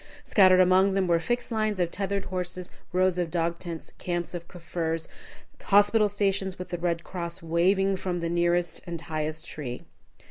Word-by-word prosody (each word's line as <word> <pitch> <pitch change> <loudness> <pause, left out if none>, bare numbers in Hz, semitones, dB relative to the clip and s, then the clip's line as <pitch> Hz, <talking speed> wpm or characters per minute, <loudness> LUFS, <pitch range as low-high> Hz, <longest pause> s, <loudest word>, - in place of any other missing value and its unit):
Scattered 185 -3 +6
among 185 +2 +5
them 195 -1 +2
were 170 -1 +3
fixed 240 +9 -2
lines 215 -3 0
of 175 -1 +1
tethered 200 0 -2
horses, 180 -1 -4 0.2
rows 185 0 +2
of 175 -2 0
dog 170 0 -1
tents, 170 -3 -7
camps 175 -1 -2
of 170 -1 -6
Kaffirs, 165 -2 -3 0.5
hospital 205 +1 +4
stations 195 -2 0
with 180 - -7
the 175 - -3
Red 170 -1 -1
Cross 170 -1 -6
waving 190 +4 +2
from 180 -1 -2
the 170 - -2
nearest 175 0 +1
and 170 -1 -4
highest 155 0 -4
tree. 125 -5 -6
175 Hz, 170 wpm, -27 LUFS, 170-190 Hz, 0.5 s, Scattered